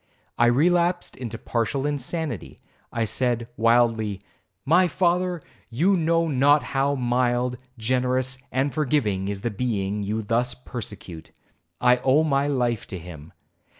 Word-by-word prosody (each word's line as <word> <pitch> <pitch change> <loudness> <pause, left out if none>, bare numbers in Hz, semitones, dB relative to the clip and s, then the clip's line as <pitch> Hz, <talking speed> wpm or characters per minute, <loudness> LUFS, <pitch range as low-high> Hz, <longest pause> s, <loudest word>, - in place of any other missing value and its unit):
I 120 - +4
relapsed 175 +7 +2
into 115 -3 -6
partial 120 +5 -2
insanity. 145 - -3 0.3
I 115 -1 0
said 120 +1 -1
wildly, 115 -4 +2 0.4
'My 180 +5 +4
father, 175 0 0 0.3
you 170 +12 +2
know 165 -1 +2
not 145 +1 +4
how 140 +1 +1
mild, 125 0 0 0.2
generous, 130 +2 0
and 135 +2 0
forgiving 125 -11 0
is 100 -1 -4
the 120 - -2
being 105 -2 -2
you 105 +2 -2
thus 120 +3 0
persecute,—I 95 -1 -4
owe 135 +5 +3
my 140 -2 +1
life 125 -6 -1
to 95 - -6
him. 80 -3 -11
125 Hz, 125 wpm, -24 LUFS, 110-145 Hz, 0.4 s, I